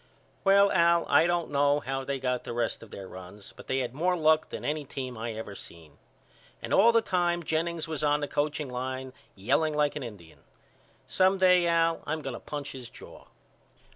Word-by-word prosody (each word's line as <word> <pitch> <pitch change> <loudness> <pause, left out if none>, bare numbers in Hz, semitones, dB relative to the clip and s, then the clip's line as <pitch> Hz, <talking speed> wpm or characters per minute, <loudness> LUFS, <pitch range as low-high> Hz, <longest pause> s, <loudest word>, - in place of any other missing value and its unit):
Well 200 0 +5
Al 170 -1 +4
I 165 - +5
don't 175 -2 -1
know 145 0 +3
how 135 -1 -3
they 135 0 -3
got 125 -1 -1
the - - -6
rest 115 -1 -1
of 115 - -12
their 95 -1 -9
runs 95 +2 -11
but - - -13
they 130 - 0
had 125 -1 -4
more 180 +6 +1
luck 155 -1 +3
than - - -6
any 150 0 -1
team 130 -2 -6
I 115 0 -4
ever 110 -2 -7
seen. 80 -6 -12 0.6
And - - -4
all 225 +4 +6
the 230 -1 +3
time 175 -3 0
Jennings 165 +1 -1
was 155 -2 -4
on 145 0 +3
the 145 - -3
coaching 145 0 -1
line 130 +1 -5 0.2
yelling 140 +10 +1
like 150 -1 +1
a - - -3
Indian. 100 -10 -10 0.7
Some 190 +1 +2
day 180 -2 +5
Al 165 -1 +2
I'm 155 0 -2
going 135 - -4
to - - -6
punch 145 -1 -6
his 125 -3 -9
jaw. - - -14
145 Hz, 200 wpm, -28 LUFS, 125-170 Hz, 0.7 s, all